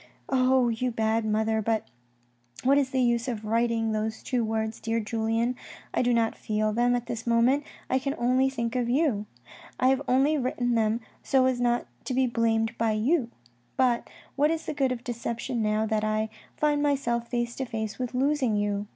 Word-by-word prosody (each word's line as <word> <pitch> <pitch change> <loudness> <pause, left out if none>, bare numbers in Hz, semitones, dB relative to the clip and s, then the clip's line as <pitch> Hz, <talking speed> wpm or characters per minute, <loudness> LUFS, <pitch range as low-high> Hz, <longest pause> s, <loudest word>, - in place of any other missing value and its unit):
Oh, 255 -1 +3
you 235 +2 -1
bad 225 -1 0
mother! 220 +1 +1
but 220 0 0 0.8
what 275 +2 +5
is 270 -2 0
the 260 -1 +1
use 235 0 +1
of 225 -4 -3
my 215 - -5
writing 230 -1 +1
those 220 0 -2
two 245 -2 0
words, 220 0 -2
dear 225 +1 -1
Julien? 225 +2 0 0.4
I - - +2
do 245 -1 +2
not 230 -1 +2
feel 215 0 -1
them, 245 +2 +2
at 245 -1 -2
this 235 -1 -5
moment 240 +5 +3 0.2
I 260 - +1
can 275 +2 -2
only 255 +2 +2
think 235 -2 -3
of 245 -2 0
you. 245 -7 +1 0.5
I 255 - +4
have 265 +1 +2
only 275 +4 +3
written 245 -1 0
them 225 0 +1 0.2
so 265 -2 +3
as 255 -1 +1
not 240 0 +1 0.2
to 255 - -2
be 260 0 +3
blamed 225 -1 +1
by 225 -1 +2
you, 240 +4 +1 0.5
but 250 -2 +2 0.3
what 290 +2 +3
is 325 0 -2
the - - -3
good 270 -3 +1
of 245 -1 -4
deception 235 0 -3
now 215 0 +1
that 215 -1 0
I 215 0 0 0.3
find 295 -1 +2
myself 250 -5 0
face 240 -1 -2
to 265 - -2
face 220 -2 -4
with 250 0 -3
losing 265 -3 +1
you? 205 0 -1
235 Hz, 195 wpm, -27 LUFS, 225-255 Hz, 0.8 s, what